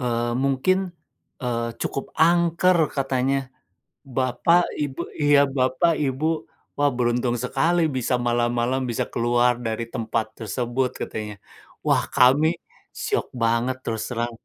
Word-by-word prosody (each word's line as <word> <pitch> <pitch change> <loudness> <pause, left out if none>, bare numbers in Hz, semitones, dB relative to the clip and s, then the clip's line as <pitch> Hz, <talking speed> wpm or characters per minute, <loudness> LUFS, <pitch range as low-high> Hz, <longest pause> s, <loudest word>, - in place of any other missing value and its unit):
eee, 120 -1 -1
mungkin, 185 +8 +1 0.6
eee, 115 -1 -1
cukup 135 - -4
angker, 170 +2 +3 0.2
katanya. 135 0 0 0.6
"Bapak, 135 +7 +3 0.2
ibu" 145 +1 -2 0.2
iya, 145 -1 +6
"Bapak, 135 +4 +1
ibu, 150 +3 -1 0.3
wah 145 - +4
beruntung 120 0 +1
sekali 135 +8 +1
bisa 130 -1 0
malam-malam 120 +2 +1
bisa 120 - -1
keluar 120 +1 +2
dari 110 +1 -2
tempat 115 -2 -1
tersebut." 120 +3 -2
Katanya. 105 -1 -5 0.5
Wah, - - +2
kami 145 +7 +5 0.4
syok 420 - -1
banget 115 +2 +1
terus 110 -1 -3
terang. 120 0 -2
130 Hz, 115 wpm, -23 LUFS, 120-145 Hz, 0.6 s, iya